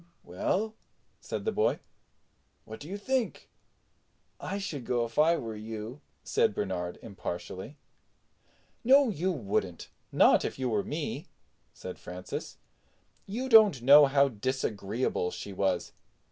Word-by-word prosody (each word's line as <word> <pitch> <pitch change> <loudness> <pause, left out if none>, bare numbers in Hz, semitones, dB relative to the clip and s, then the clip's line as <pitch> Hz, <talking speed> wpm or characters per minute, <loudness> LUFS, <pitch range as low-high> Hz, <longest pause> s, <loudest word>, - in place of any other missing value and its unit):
"Well," 200 - -1 0.5
said - - -5
the 445 - +1
boy, 435 - +1 0.9
"what - - -9
do 150 - -10
you 200 - -4
think?" 255 +3 -2 0.9
"I 200 - -4
should 195 -10 -5
go 120 -1 0
if 115 - -4
I 165 +2 +5
were 115 -5 -5
you," 110 +4 -7 0.2
said - - +1
Bernard 90 0 -3
impartially. 95 +4 -6 1.1
"No, 270 +2 +6
you 185 -1 -1
wouldn't; 100 - -3 0.2
not - - +5
if - - -3
you 130 -1 -1
were 105 -3 0
me," - - -4 0.4
said 90 - -9
Francis. 90 +1 -7 0.7
"You 235 +7 -3
don't 215 - +6
know 145 +2 +9
how 140 0 +4
disagreeable 110 -4 -2
she 100 - -7
was. 95 -2 0
130 Hz, 130 wpm, -29 LUFS, -, 1.1 s, know